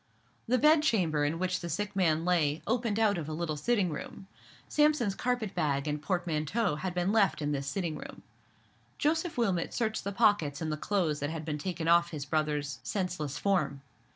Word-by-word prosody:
The 250 +2 +3
bed 300 +4 +5
chamber 175 - +2
in 145 +3 0
which 180 0 -1
the 170 - -5
sick 205 +2 -3
man 165 -4 +2
lay 160 -4 +1
opened 230 -2 0
out 210 -4 +3
of 155 -1 -5
a - - -3
little 160 -1 -2
sitting 195 +2 +1
room. 155 - -7 0.4
Sampson's 295 -9 +2
carpet 240 -2 -2
bag 145 -4 0
and 150 0 -2
portmanteau 175 +1 -1
had 180 +2 -4
been 180 +2 +1
left 210 -3 +3
in 150 -1 -1
this 140 -1 -2
sitting 170 0 -2
room. - - -10 0.7
Joseph 320 +2 0
Wilmot 195 -8 0
searched 220 -2 -1
the 200 - -3
pockets 200 -9 +2
in 160 -1 -2
the - - 0
clothes 160 -3 0
that 145 - -2
had 160 -1 -5
been 150 -2 -3
taken 170 -1 -3
off 170 0 +5
his 150 -4 -5
brother's 150 -1 -1
senseless 180 -8 -3
form. 180 -8 0
175 Hz, 190 wpm, -30 LUFS, 155-205 Hz, 0.7 s, bed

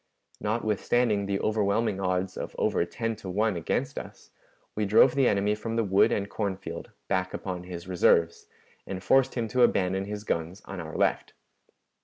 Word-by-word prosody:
Notwithstanding 110 0 0
the 100 0 -1
overwhelming 105 -1 +1
odds 90 0 -1
of - - -6
over - - +1
ten 115 +5 -3
to 100 -4 -8
one 105 +2 +1
against 85 - -2
us, - - -12 0.4
we 105 - -1
drove 110 +5 +5
the 135 -2 +3
enemy 100 +1 +2
from 110 +2 -4
the 115 - +2
wood 100 -1 +4
and 100 -1 0
corn 100 -2 -2
field 85 -3 -7 0.2
back 95 -1 -1
upon 90 -2 -5
his 90 -1 -8
reserves, 85 -2 +2 0.4
and 95 -1 -5
forced 135 +3 +3
him 115 -3 -1
to 125 +3 +1
abandon 95 -4 +2
his 105 0 -5
guns 85 0 -3
on 95 - -7
our 80 -2 -6
left. - - 0
100 Hz, 175 wpm, -27 LUFS, 95-110 Hz, 0.4 s, drove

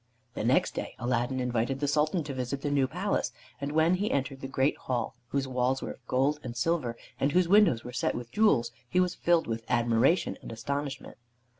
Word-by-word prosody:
The - - -3
next - - +2
day - - -5
Aladdin 120 +2 -1
invited 125 +1 -1
the 145 - 0
Sultan 155 +4 +1
to 145 -1 -5
visit 130 +2 -3
the 145 - 0
new 140 -2 +3
palace, 185 +7 -1 0.3
and 140 +1 -2
when 160 +3 +3
he 200 +3 0
entered 135 0 -2
the 135 - -4
great 135 +1 +1
hall, 125 -2 -2
whose 135 +1 -1
walls 130 +1 0
were - - -4
of 125 - -14
gold 140 +4 +1
and 120 -3 -7
silver 125 -3 0 0.2
and 140 +2 +1
whose 180 -1 +4
windows 195 - +5
were 125 - -8
set 125 - 0
with 120 -1 -6
jewels, 130 - +3 0.2
he 180 - +2
was 180 -1 +2
filled 170 -1 +2
with 115 0 -3
admiration 120 +6 +2
and - - -8
astonishment. 140 +4 -4
135 Hz, 205 wpm, -29 LUFS, 125-155 Hz, 0.3 s, windows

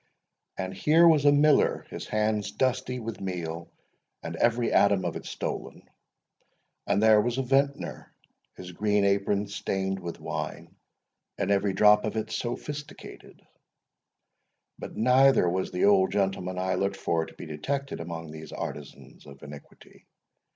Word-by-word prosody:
And 95 0 -4
here 160 - +4
was 155 -3 +4
a 145 - +7
miller, 145 +1 +3
his - - -7
hands 105 -1 -1
dusty 130 +3 -1
with 115 -1 -6
meal, 85 -3 -5 0.5
and 85 0 -5
every 120 +5 +1
atom 100 -2 +3
of - - -2
it - - -7
stolen; - - -6 1.0
and 100 - +2
there 110 -1 +6
was 120 +2 -2
a 135 - 0
vintner, 140 +2 -1 0.4
his 90 -1 -9
green 105 +2 +1
apron 100 +1 +1
stained 95 -1 -3
with 85 -2 -7
wine, - - -6 0.6
and - - -1
every 100 -1 +1
drop 105 +2 +5
of 110 0 -3
it 110 0 -3
sophisticated; 140 +6 -7 1.4
but - - -8
neither 130 -2 +4
was 95 +2 -1
the 90 - 0
old 100 -2 +4
gentleman 95 -2 -1
I 95 0 -1
looked 100 +1 -1
for 80 -1 -1
to - - -15
be - - -9
detected 135 - -4
among 80 -1 -7
these 80 0 -10
artisans 75 -2 -8
of 70 -1 -14
iniquity. 70 0 -14
100 Hz, 145 wpm, -27 LUFS, 90-120 Hz, 1.4 s, a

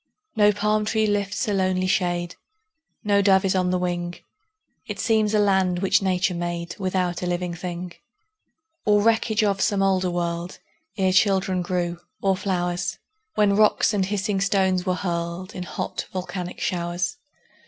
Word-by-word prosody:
No 210 -1 +5
palm 210 +1 +1
tree 220 0 +1
lifts 205 +2 -1
a 210 - 0
lonely 185 -1 +1
shade, 175 -2 0 0.7
No 205 -2 +3
dove 195 -1 +4
is 190 - +2
on 185 -1 +1
the 180 - +1
wing; 175 -1 -2 0.7
It - - -5
seems 220 -2 +2
a - - +4
land 190 -3 +2
which 195 +2 +2
Nature 185 -1 +1
made 170 0 -4
Without 185 -2 -1
a 180 - -2
living 175 0 -2
thing, 175 +1 -5 0.9
Or 205 -1 +3
wreckage 225 0 +2
of 200 -2 +1
some 200 -1 +2
older 190 -1 +2
world, 175 0 -3 0.4
Ere 190 -1 +2
children 190 -1 +2
grew, 175 -1 -2 0.2
or 195 -1 +2
flowers, 180 -2 -2 0.4
When 205 -1 +3
rocks 215 +1 +4
and 200 -2 +1
hissing 200 -1 -1
stones 190 -2 +1
were 180 - +2
hurled 170 0 -3
In 180 - -6
hot, 180 - -4
volcanic 185 -1 -5
showers. 175 +5 -2
185 Hz, 155 wpm, -24 LUFS, 175-200 Hz, 0.9 s, No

